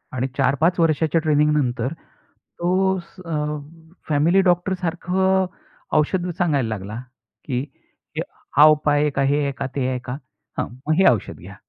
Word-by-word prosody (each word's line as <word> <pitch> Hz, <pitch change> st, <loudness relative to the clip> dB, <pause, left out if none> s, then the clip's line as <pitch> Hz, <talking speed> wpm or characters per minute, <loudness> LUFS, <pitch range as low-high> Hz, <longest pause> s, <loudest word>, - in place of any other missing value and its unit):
आणि 130 Hz, +1 st, 0 dB
4-5 140 Hz, +7 st, +2 dB
वर्षाच्या 160 Hz, 0 st, +2 dB
ट्रेनिंग 150 Hz, -1 st, +3 dB
नंतर 130 Hz, -1 st, 0 dB, 0.7 s
तो 190 Hz, +2 st, +2 dB
स् 185 Hz, -, -14 dB
अ, 150 Hz, -2 st, -2 dB, 0.5 s
फॅमिली 160 Hz, +6 st, +4 dB
डॉक्टरसारखं 185 Hz, +1 st, +1 dB, 0.5 s
औषधं 175 Hz, +4 st, +1 dB
सांगायला 145 Hz, -9 st, +1 dB
लागला, 105 Hz, -1 st, -5 dB, 0.5 s
की 125 Hz, -2 st, -1 dB, 0.5 s
की -, -, -1 dB, 0.4 s
"हा 145 Hz, -, +9 dB
उपाय 150 Hz, 0 st, +1 dB
एक 140 Hz, -2 st, -3 dB
आहे, 135 Hz, +1 st, +3 dB
हे 145 Hz, -, +1 dB
आहे 140 Hz, -, 0 dB
का? -, -, -2 dB
ते 130 Hz, -2 st, 0 dB
आहे 125 Hz, -1 st, -2 dB
का? 125 Hz, +1 st, -4 dB, 0.4 s
हं, -, -, -1 dB, 0.2 s
मग 155 Hz, -, +3 dB
हे 190 Hz, -, +5 dB
औषध 110 Hz, -6 st, -3 dB
घ्या." -, -, -11 dB
150 Hz, 155 wpm, -22 LUFS, 135-175 Hz, 0.7 s, हा